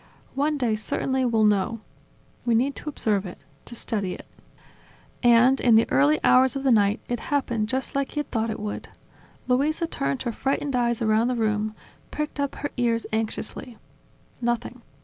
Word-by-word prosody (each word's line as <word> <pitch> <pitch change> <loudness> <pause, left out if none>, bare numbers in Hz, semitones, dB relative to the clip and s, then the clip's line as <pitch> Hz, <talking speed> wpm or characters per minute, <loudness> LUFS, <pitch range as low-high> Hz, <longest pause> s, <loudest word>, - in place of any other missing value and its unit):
One 290 +2 0
day, 240 -5 +1
certainly, 260 +4 -1
we'll 225 -3 +2
know. 210 +2 +2 0.6
We 235 -2 +2
need 265 +5 +1
to 305 - -5
observe 210 -8 0
it, 175 - -11 0.2
to 235 - -6
study 200 -6 -2
it." - - -12 1.0
And, 245 +2 +5
in 235 -3 +5
the 225 - +5
early 145 +3 +4
hours 260 +1 +5
of 275 - -3
the 270 - +3
night, 205 0 +3
it 240 -1 -2
happened 235 -7 -1
just 260 +2 -2
like 275 -1 -1
he 295 - 0
had - - -10
thought 225 -1 0
it 220 - -4
would. 210 0 -5 0.6
Luisa 295 +6 +1
turned 140 - -2
her 240 - -1
frightened 275 +3 -1
eyes 235 -2 +1
around 220 +1 +3
the 250 - 0
room, 215 -1 -1 0.3
pricked 300 -1 -4
up 280 -1 -1
her 290 - -4
ears 235 -2 +1
anxiously... 220 +2 -3 0.6
Nothing. 240 +1 -2
235 Hz, 175 wpm, -25 LUFS, 215-265 Hz, 1.0 s, And